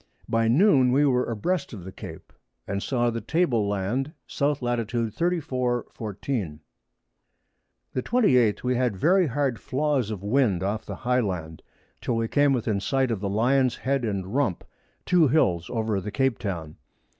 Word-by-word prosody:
By 115 0 +1
Noon 135 - +5
we 140 +3 +4
were 125 -2 +2
a 115 - -2
breast 180 - -2
of 100 -5 -8
the 95 - -8
Cape, - - -10 0.3
and 100 0 -2
saw 120 -1 0
the 115 0 -4
Table 120 - +1
Land 105 +9 -2
S. - - -10 0.2
Lat. 120 -3 -1
34. 125 0 -1
14. 100 - -4 1.3
The 130 - -1
28th 125 - +3
We 125 0 +1
had 120 -5 0
very 180 - +3
hard 135 -2 -1
Flaws 140 -4 0
of 105 -3 -5
Wind 105 -5 +2
off 100 +3 -2
the - - -5
High 125 0 +3
Land, 80 -7 -4 0.4
till 120 - -1
we 115 0 0
came 145 +3 +3
within 115 -5 0
Sight 130 +4 0
of 110 - -1
the 100 0 -2
Lions 125 +5 +2
Head 135 0 -1
and 100 -3 -3
Rump, 130 -10 0 0.4
two 175 -3 +4
Hills 95 - +2
over 110 -4 -1
the 105 - -5
Cape 135 +2 0
Toun. 85 -7 -5
120 Hz, 165 wpm, -25 LUFS, 105-135 Hz, 1.3 s, Noon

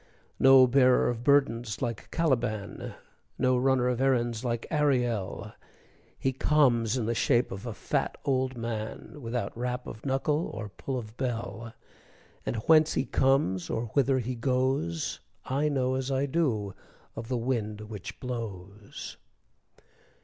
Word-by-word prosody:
No 135 -1 +8
bearer 130 0 +4
of 120 -1 -3
burdens 120 -6 +2
like 120 -5 -4
Caliban, 120 -10 -1 0.4
No 130 0 +3
runner 130 0 +2
of 125 0 0
errands 120 -4 +1
like 120 -2 -2
Ariel, 125 -9 0 0.6
He 135 - 0
comes 130 -5 +3
in 120 - -1
the 115 - 0
shape 120 +1 +2
of 100 +5 -6
a 115 - -3
fat - - -1
old 130 -1 0
man, 115 +5 -5
Without 120 0 -3
rap 125 +1 -3
of 110 - -9
knuckle 145 +4 0
or 110 -2 -5
pull 130 +6 -5
of 110 -2 -7
bell; 115 -3 -4 0.7
And - - -1
whence 155 -1 +5
he - - +1
comes, 130 -10 +1
or 115 0 -2
whither 135 -1 +3
he 125 0 -2
goes, 125 - 0 0.3
I 145 +3 +1
know 130 -3 +1
as 130 0 -2
I 135 +1 +1
do 130 - 0 0.4
of 115 0 -6
the 125 0 -1
wind 115 -3 -2
which 105 -1 -8
blows. 105 -5 -7
125 Hz, 140 wpm, -28 LUFS, 115-135 Hz, 0.7 s, No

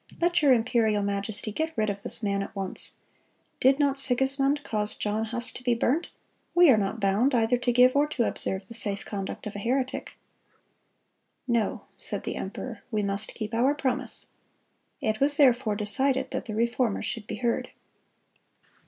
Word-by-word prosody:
Let 345 0 +2
your 285 -3 +5
imperial 225 -3 +2
majesty 200 +2 -3
get 315 +5 -3
rid 215 -1 +1
of 200 0 -7
this 230 - 0
man 200 -1 0
at 195 - -7
once. 195 -1 -1 0.6
Did 265 +1 +4
not 280 -2 +1
Sigismund 275 +2 +3
cause 210 -1 -2
John 215 +1 -1
Huss 240 +2 -3
to - - -9
be 245 -1 +2
burnt? 275 +8 0 0.5
We 350 -4 +7
are 230 - +5
not 205 +2 -1
bound 215 +7 +2
either 230 +1 +2
to 245 - +1
give 250 +2 +5
or 290 +1 +3
to 265 -5 -1
observe 190 -3 -3
the - - -9
safe 205 -3 +1
conduct 195 -2 -5
of 210 - -6
a - - -4
heretic." 255 +4 -2 1.3
"No," 235 -4 0
said - - -4
the - - -3
emperor; - - -6
"we 215 -3 -1
must 200 +1 -2
keep 215 0 -5
our 255 +5 +2
promise."(211) 260 -4 -5
It 215 - -12
was 285 +1 +5
therefore 250 -6 +4
decided 260 +6 +1
that 260 -1 -3
the 215 -4 -5
Reformer 235 -1 0
should 220 -2 -4
be - - -4
heard. 240 -1 -1
235 Hz, 175 wpm, -27 LUFS, 210-265 Hz, 1.3 s, We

